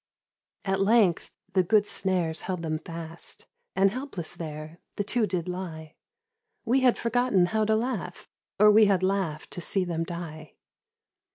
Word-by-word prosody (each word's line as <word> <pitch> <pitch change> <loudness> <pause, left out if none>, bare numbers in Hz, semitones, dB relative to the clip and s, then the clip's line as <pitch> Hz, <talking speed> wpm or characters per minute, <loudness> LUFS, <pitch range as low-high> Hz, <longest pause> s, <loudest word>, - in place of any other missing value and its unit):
At 195 -1 0
length 200 -4 +3 0.2
the 190 - +4
good 205 +3 +3
snares 180 -6 0
held 180 -2 -4
them 155 -1 -2
fast 165 0 -7 0.3
And 195 +1 +4
helpless 250 - -4
there 155 0 -7 0.2
the 205 - -1
two 220 +1 +1
did 180 -2 -2
lie, 165 -4 -6 0.7
We 250 +4 +3
had 255 -2 +3
forgotten 235 -5 +2
how 215 +4 0
to 220 +1 +2
laugh 220 -6 -3 0.3
Or 210 +1 +8
we 215 +1 +7
had 195 -2 +2
laughed 185 -5 -1
to 175 - -6
see 190 +2 +1
them 165 -2 -2
die. 160 -3 -7
185 Hz, 155 wpm, -27 LUFS, 165-210 Hz, 0.7 s, Or